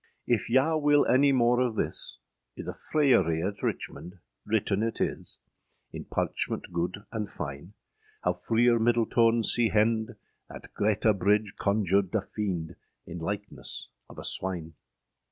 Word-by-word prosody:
If 120 -3 0
yow 140 +6 +3
wyl 145 -1 +4
any 140 +2 +5
more 120 -2 +3
of 125 -3 +1
thys, - - -3 0.4
Iâ - - -6
the - - -4
fryarie 95 - +2
at 100 0 -6
Richmond 90 +2 -4 0.3
written 105 -2 +1
yt 115 0 -2
is, - - -3 0.6
In - - -7
parchment - - -3
gude 90 +4 -3
and 110 -3 -3
fyne, 80 0 -7 0.5
How 90 - +2
Freer 115 +6 +2
Myddeltone 115 0 +3
sea 120 -2 +4
hende, 110 +1 +1 0.3
Att - - -11
Greta 105 +1 +2
Bridge 105 +1 +1
conjured 100 -1 +1
a 110 - +2
fiende, 90 -6 -4 0.3
In 85 0 -7
lykeness 100 +4 -5 0.2
of - - -13
a - - -7
swyne. 85 -4 -3
105 Hz, 140 wpm, -28 LUFS, 95-120 Hz, 0.6 s, any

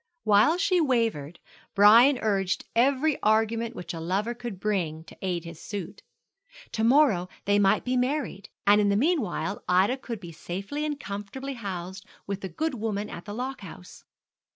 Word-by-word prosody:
While 215 +10 +4
she 360 0 +2
wavered, 225 - 0 0.4
Brian 230 +7 +7
urged 195 -3 0
every 275 +5 +2
argument 225 +2 +1
which 175 -1 -6
a 165 - -5
lover 195 +8 -1
could 235 -5 -7
bring 175 -7 -2
to 160 - -15
aid 175 -3 -2
his 165 -1 -10
suit. 200 -5 -6 0.7
To 220 - -2
morrow 230 -8 +4 0.2
they 205 0 +3
might 195 -1 +3
be 255 0 0
married, 250 -6 -2 0.2
and 205 +1 +6
in 205 - +2
the 200 - +2
meanwhile 245 - 0
Ida 190 +8 +3
could 235 -4 -6
be 175 -3 -9
safely 195 - -5
and 295 -2 -3
comfortably 205 +7 -6
housed 190 -4 -6 0.2
with 200 0 -4
the 190 - -5
good 315 - -2
woman 215 -3 -3
at 170 - -8
the 205 - -6
lock 260 +1 -4
house. 155 - -12
210 Hz, 170 wpm, -27 LUFS, 190-250 Hz, 0.7 s, Brian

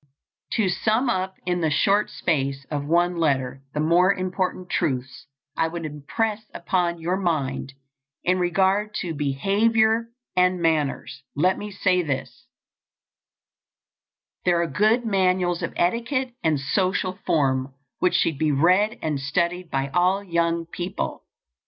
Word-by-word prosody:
To 220 -4 +2
sum 220 +7 +1
up 190 -2 -2
in 175 -1 0
the 160 - +2
short 200 +7 +2
space 140 -4 -1
of 145 -1 -2
one 175 +2 +2
letter 135 -5 0
the - - -1
more 170 +5 +4
important 185 -1 -2
truths 130 -6 -2 0.3
I 165 - +1
would 165 0 -5
impress 205 +9 -2
upon 175 0 0
your 175 +3 -1
mind 140 -7 -2 0.5
in 185 +1 +2
regard 190 +4 +1
to 175 -3 -3
behavior 220 +11 +2 0.3
and 180 0 +3
manners, 150 -4 -1
let 180 +6 +3
me 210 - -5
say 185 -2 +1
this: 170 - -5 2.0
There 175 -1 +3
are - - -1
good 220 +6 +2
manuals 185 -4 +1
of - - -2
etiquette 240 +7 0
and 155 -3 +2
social 185 +5 0
form 130 -3 +1 0.2
which 180 - +2
should 155 -5 +1
be 155 -1 +2
read 185 +10 +3
and 155 -3 -1
studied 170 +5 -1
by 135 0 -1
all 180 +5 +2
young 170 -2 0
people. 175 +2 -5
175 Hz, 135 wpm, -24 LUFS, 155-190 Hz, 2.0 s, more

